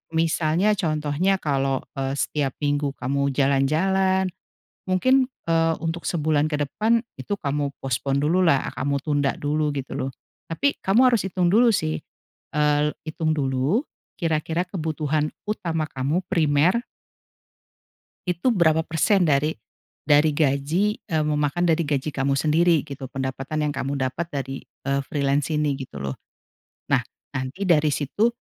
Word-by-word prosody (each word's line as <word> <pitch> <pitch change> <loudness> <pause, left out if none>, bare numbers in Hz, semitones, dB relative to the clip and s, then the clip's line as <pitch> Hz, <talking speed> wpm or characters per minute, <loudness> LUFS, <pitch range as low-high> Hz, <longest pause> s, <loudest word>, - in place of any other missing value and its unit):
misalnya 165 +5 +2
contohnya, 160 +2 0
kalau, 135 -3 0 0.2
eee, 135 0 -2
setiap 140 -3 -1
minggu 145 -1 0
kamu 140 +2 0
jalan-jalan, 185 +8 +2 0.6
mungkin, 255 +8 +3 0.2
eee, 165 0 +3
untuk 165 +1 -3
sebulan 155 -2 +1
ke 150 - 0
depan 230 +6 +2 0.2
itu 205 - -3
kamu 145 -2 -1
postpone 135 +1 -1
dulu 170 +6 +2
lah, 140 -6 +3
kamu 140 0 0
tunda 145 -2 +1
dulu 150 +1 0
gitu 135 -1 -5
loh. 135 -1 -2 0.4
Tapi 280 +13 +1
kamu 230 +7 +4
harus 230 - +3
hitung 180 -1 0
dulu 230 +5 +5
sih, 80 - 0 0.6
el 150 0 +2
hitung 155 0 -1
dulu, 135 - +1 0.4
kira-kira 165 +1 -1
kebutuhan 155 -3 -1 0.2
utama 165 -7 -1
kamu, 140 +6 -1
primer 165 +5 +2 1.4
itu 180 +8 +1
berapa 160 -7 +3
persen 175 +5 +2
dari 150 +2 +2 0.5
dari 150 +1 +5
gaji, 150 +8 +1
eee, 160 -1 0
memakan 150 +3 +1
dari 165 +1 +2
gaji 145 -1 -1
kamu 140 -1 0
sendiri 160 +3 +3
gitu, 135 -2 -8
pendapatan 135 +3 -3
yang - - -1
kamu 140 +1 -2
dapat 160 +7 -4
dari, 135 -1 -3
eee, 140 +1 -3
freelance 140 +1 0
ini 150 -2 +1
gitu 130 - -8
loh. 70 -1 -4 0.8
Nah, - - +5 0.3
nanti 130 +9 -4
dari 155 -5 +4
situ, 150 - +1
150 Hz, 135 wpm, -24 LUFS, 140-170 Hz, 1.4 s, dulu